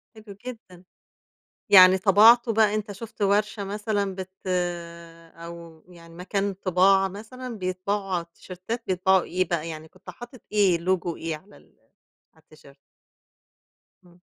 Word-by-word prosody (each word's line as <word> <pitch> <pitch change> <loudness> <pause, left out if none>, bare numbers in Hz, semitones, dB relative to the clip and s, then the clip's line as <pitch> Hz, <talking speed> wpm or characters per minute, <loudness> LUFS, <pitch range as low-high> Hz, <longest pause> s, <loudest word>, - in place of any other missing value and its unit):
حلو 215 -2 -12
جدًا، 190 -8 -10 0.9
يعني 185 -1 +8
طبَعته 225 +5 +5
بقى 215 -1 +3
أنت 210 -1 -3
شُفت 215 +1 -9
ورشة 205 +1 +1
مثلًا، 205 -1 -2
بت 190 0 -7 1.1
أو 170 -1 -11
يعني 170 -2 -16
مكان 195 +3 -2
طباعة 190 +1 +3
مثلًا، 225 +4 -9
بيطبعوا 190 +2 -3
على 170 -1 -1
التيشيرتات 185 +7 -8
بيطبعوا 190 0 +2
إيه 185 -1 -2
بقى، 165 -1 -2
يعني 160 0 -8
كنت - - -13
حاطط 240 0 -12
إيه 195 -5 +3
لوجو 175 -1 -1
إيه 160 -1 -4
على 195 +7 -18
ال - - -24 0.6
على 160 - -25
التيشيرت؟ 150 -3 -19 1.3
إمم. 175 0 -22
190 Hz, 135 wpm, -25 LUFS, 175-210 Hz, 1.3 s, يعني